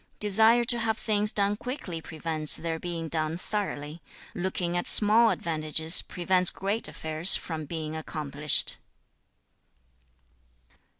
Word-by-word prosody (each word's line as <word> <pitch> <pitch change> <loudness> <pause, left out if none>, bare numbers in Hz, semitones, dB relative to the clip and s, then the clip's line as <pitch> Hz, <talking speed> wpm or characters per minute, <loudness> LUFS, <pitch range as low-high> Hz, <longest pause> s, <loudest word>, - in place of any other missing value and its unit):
Desire 220 +3 +4
to 240 0 -3
have 225 -1 -2
things 210 -1 0
done 205 0 -1
quickly 205 - -7
prevents 155 -1 0
their 165 -1 -5
being 170 -2 -6
done 160 0 -3
thoroughly. 170 -6 -6 0.3
Looking 175 -1 -4
at 175 - -2
small 225 +2 +5
advantages 160 -2 +3
prevents 180 0 +1
great 200 +4 -4
affairs 160 +3 +2
from 160 -2 -6
being 155 +1 -7
accomplished.' 150 -2 0
175 Hz, 115 wpm, -26 LUFS, 160-210 Hz, 0.3 s, small